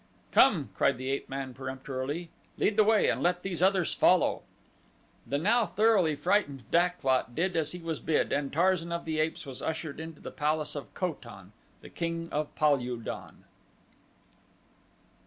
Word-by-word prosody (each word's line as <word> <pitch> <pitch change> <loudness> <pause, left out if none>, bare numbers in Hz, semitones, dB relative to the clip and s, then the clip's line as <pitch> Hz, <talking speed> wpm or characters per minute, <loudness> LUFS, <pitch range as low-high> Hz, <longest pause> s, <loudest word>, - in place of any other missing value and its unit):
"Come!" - - +4
cried - - +2
the 130 +1 -3
ape 140 - -3
man 135 -1 -5
peremptorily, 130 +5 -5 0.3
"lead 210 - +1
the 215 - +6
way, 215 0 +4
and - - 0
let 180 0 +1
these 180 -3 -3
others 190 -2 +3
follow." - - +3 0.9
The 140 - 0
now 220 +8 +3
thoroughly 190 -5 +3
frightened 145 -7 0
Dak 175 +1 +2
lot 130 -2 +1
did 180 +2 0
as 155 -2 +1
he - - -5
was 165 -3 -4
bid, 155 -1 0
and 140 -1 -1
Tarzan 170 +1 +1
of 170 0 -3
the 160 -1 -2
Apes 155 +1 -1
was 135 -2 -7
ushered 160 -2 -4
into 160 -1 -8
the - - -8
palace 150 +1 -1
of 145 - -7
Kotan, 115 - -5 0.4
King 165 0 -3
of 150 0 -3
Pal 150 -2 +3
ul 125 0 -4
don. 115 - -8
160 Hz, 165 wpm, -29 LUFS, 140-180 Hz, 0.9 s, the